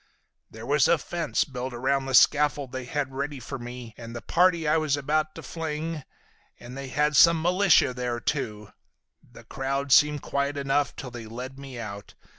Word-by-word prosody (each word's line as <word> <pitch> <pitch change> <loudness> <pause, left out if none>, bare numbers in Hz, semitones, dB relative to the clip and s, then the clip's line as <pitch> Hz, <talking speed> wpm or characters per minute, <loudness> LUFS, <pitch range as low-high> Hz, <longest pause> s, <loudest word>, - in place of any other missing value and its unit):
"There 110 +1 -10
was 145 -2 +3
a 170 - +4
fence 170 +2 -1
built 130 -2 -6
around 135 +2 0
the 135 - +1
scaffold 145 -1 +4
they 130 0 -5
had 135 +1 -3
ready 140 +1 -4
for 135 +2 -7
me 120 -1 -8
and 115 0 -8
the 120 - -5
party 170 -2 +2
I 150 - +3
was 155 -3 +1
about 155 +2 -1
to - - -9
fling, 160 -1 -4 0.6
and 125 +1 -10
they 135 0 -6
had 150 +4 +1
some 165 +5 +7
militia 180 -4 +4
there, 125 -1 -3
too. 105 -6 -3 0.6
The - - -14
crowd 135 +1 -3
seemed 150 0 +5
quiet 140 +1 -1
enough 140 -1 0
till 125 - -7
they 120 -2 -8
led 125 +4 -8
me 135 -2 -9
out. 100 -3 -8
140 Hz, 185 wpm, -26 LUFS, 125-150 Hz, 0.6 s, some